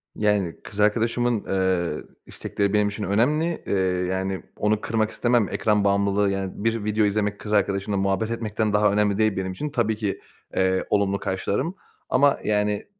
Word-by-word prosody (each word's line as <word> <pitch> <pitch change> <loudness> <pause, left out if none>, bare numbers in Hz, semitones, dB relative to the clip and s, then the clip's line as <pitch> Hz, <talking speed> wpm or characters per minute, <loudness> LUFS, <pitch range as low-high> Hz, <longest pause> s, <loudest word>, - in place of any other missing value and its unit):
Yani, 105 -5 +1
kız 105 - -10
arkadaşımın, 115 +2 +1
eee, 95 -4 0 0.2
istekleri 100 0 -2
benim 105 -1 +3
için 105 +1 -4
önemli. 150 - +1
Eee, - - -1 0.4
yani, 95 0 -2
onu 105 0 +1
kırmak 110 -1 0
istemem. 120 -4 +2
Ekran 105 -2 +1
bağımlılığı, 100 0 +2
yani, 95 -1 -2
bir 115 -1 0
video 105 0 +1
izlemek 105 0 0
kız 105 - -5
arkadaşımla 100 0 +1
muhabbet 100 +3 0
etmekten 110 -2 -1
daha 105 0 +4
önemli 105 -1 +2
değil 110 -2 +2
benim 95 0 -2
için. 150 +11 -4
Tabii 115 -5 0
ki, 105 -2 -3 0.3
eee, 95 0 +1
olumlu 100 -1 +1
karşılarım. 105 - -2 0.3
Ama, 140 +1 +4
yani, 105 -1 0
105 Hz, 160 wpm, -24 LUFS, 100-110 Hz, 0.4 s, daha